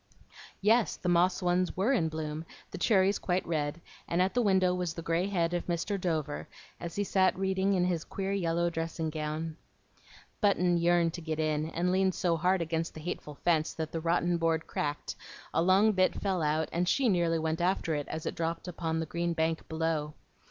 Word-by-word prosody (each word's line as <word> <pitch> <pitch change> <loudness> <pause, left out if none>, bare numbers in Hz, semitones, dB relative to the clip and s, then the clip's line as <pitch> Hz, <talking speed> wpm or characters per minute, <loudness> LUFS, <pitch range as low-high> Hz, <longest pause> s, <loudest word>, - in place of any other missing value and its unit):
Yes, 220 +3 +3
the 180 - -3
"moss 180 +2 +3
ones" 180 0 +1
were 210 +9 +2
in 165 -11 +2
bloom, 155 0 -4 0.3
the - - -6
cherries 195 -1 +3
quite 180 0 0
red, 155 -1 -2 0.3
and 170 - 0
at 185 +1 +2
the 245 - +2
window 190 -4 +3
was 180 -2 -2
the 165 - -6
gray 165 +3 +1
head 175 -4 0
of 175 - -2
Mr. 180 +3 -1
Dover, 155 -4 -2 0.3
as 170 -1 -6
he 205 - 0
sat 190 -1 +2
reading 190 +1 +1
in 180 -1 +2
his 175 -3 0
queer 195 0 -4
yellow 170 -3 0
dressing 165 -1 -3
gown. 155 +1 -4 0.8
Button 180 -4 +3
yearned 170 -1 +3
to 175 - -6
get 160 -1 -3
in, 155 0 0
and 175 +2 0
leaned 190 0 +2
so 175 -2 +1
hard 180 +2 +2
against 165 0 -2
the - - -7
hateful 150 -3 -5
fence 160 -2 +2
that 160 -1 -4
the 165 - -3
rotten 170 +1 +1
board 165 -1 +1
cracked, 145 0 -3 0.4
a - - +2
long 190 +5 +5
bit 185 -2 +2
fell 190 -3 0
out, 155 +1 +1
and 175 +1 0
she 270 +4 +2
nearly 170 -5 +2
went 160 +1 -1
after 175 -2 +1
it, 145 -1 -2
as 160 0 -5
it - - -2
dropped 165 +1 -3
upon 165 -2 -2
the 160 - -1
green 170 +2 -2
bank 160 0 -1
below. 160 -2 -1
170 Hz, 200 wpm, -30 LUFS, 160-185 Hz, 0.8 s, long